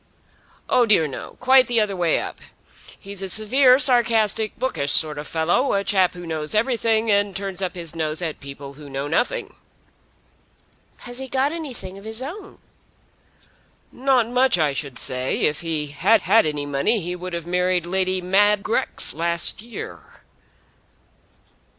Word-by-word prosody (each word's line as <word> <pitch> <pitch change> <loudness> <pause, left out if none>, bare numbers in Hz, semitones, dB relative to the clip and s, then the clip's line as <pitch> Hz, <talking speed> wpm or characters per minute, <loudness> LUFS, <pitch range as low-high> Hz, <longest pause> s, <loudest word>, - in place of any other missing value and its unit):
"Oh 245 -2 +2
dear 200 -7 +4
no; 135 - -9
quite 260 0 +5
the 240 -2 +2
other 210 -2 0
way 175 -3 +1
up. - - -7 0.6
He's 200 -1 -5
a 195 - -4
severe, 250 +6 +5
sarcastic, 225 -5 +3
bookish 145 - -1
sort 150 -2 +3
of 150 - -7
fellow, 170 +12 0
a 200 - 0
chap 190 -3 +1
who 175 0 -9
knows 155 +1 -3
everything 225 -1 +1
and 200 -1 +1
turns 195 -1 -5
up 185 -1 -3
his 170 -3 -4
nose 155 -1 -2
at 165 -4 -4
people 140 0 -10
who 145 0 -13
know 135 +1 -4
nothing." 165 +11 -2 1.5
"Has 245 +1 -7
he 265 - -6
got 265 +2 0
anything 250 - -7
of 200 - -15
his 220 +1 -3
own?" 385 +8 -9 1.3
"Not 255 -3 +1
much, 250 -2 +2
I 155 -4 +1
should 135 -3 -5
say. 130 0 -1
If 150 - 0
he 160 -3 -2
had 195 +10 +2
had 210 -3 +3
any 150 -1 -3
money 145 +11 0
he 180 0 -5
would 180 0 -7
have 170 -1 -4
married 180 0 0
Lady 185 +1 0
Mab 200 +3 +2
Grex 255 +4 -1
last 170 +4 +1
year." 235 +1 -10
190 Hz, 160 wpm, -22 LUFS, 160-230 Hz, 1.5 s, quite